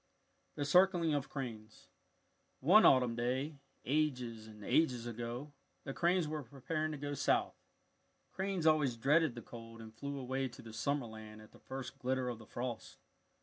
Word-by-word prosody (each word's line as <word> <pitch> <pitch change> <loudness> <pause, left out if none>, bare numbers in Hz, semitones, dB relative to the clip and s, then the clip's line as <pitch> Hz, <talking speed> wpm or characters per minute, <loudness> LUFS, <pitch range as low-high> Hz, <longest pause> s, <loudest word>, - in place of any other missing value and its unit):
THE 145 - -2
CIRCLING 175 0 +4
OF 145 -1 -1
CRANES 115 -6 -7 0.7
One 185 +11 +7
autumn 125 -3 +5
day 130 +5 -1 0.3
ages 125 -6 0
and 105 -2 -11
ages 125 -7 +2
ago, 120 +5 -5 0.3
the 135 - -5
cranes 175 0 +2
were 155 0 -3
preparing 145 +5 -3
to - - -4
go 145 +1 -4
south. 140 - +2 0.8
Cranes 190 -3 -2
always 150 -6 +4
dreaded 145 +3 +3
the 120 - -7
cold 115 -1 -10
and 110 -1 -10
flew 140 +5 -5
away 130 0 -1
to 125 - -12
the 115 -1 -10
summer 140 +4 0
land 110 -1 -10
at 110 - -14
the - - -17
first 130 -1 -7
glitter 130 0 0
of 120 -2 -5
the 110 - -13
frost. 120 -2 -5
130 Hz, 165 wpm, -35 LUFS, 115-150 Hz, 0.8 s, One